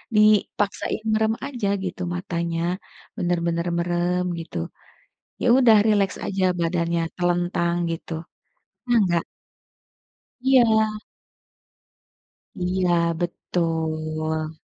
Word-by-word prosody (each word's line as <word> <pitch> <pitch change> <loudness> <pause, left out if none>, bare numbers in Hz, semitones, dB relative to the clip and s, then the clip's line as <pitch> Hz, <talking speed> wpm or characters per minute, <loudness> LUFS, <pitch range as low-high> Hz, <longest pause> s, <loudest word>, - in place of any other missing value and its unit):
dipaksain 210 0 +2
merem 220 0 +2
aja 245 -7 -3 0.2
gitu 185 0 -5
matanya, 170 -2 -2 0.6
bener-bener 170 -2 0
merem 175 +1 0 0.2
gitu, 165 - -7 0.8
ya - - +1
udah 230 -5 +6
rileks 205 -3 +2
aja 190 -1 -1 0.2
badannya 170 0 0 0.2
telentang 175 -1 +1 0.2
gitu, 165 0 -5 0.7
pernah 240 -2 +3
enggak? 175 -2 +1 1.2
Iya. 220 -5 +3 1.6
Iya 180 -1 +1 0.2
betul. 160 -2 -2
175 Hz, 80 wpm, -23 LUFS, 170-210 Hz, 1.6 s, udah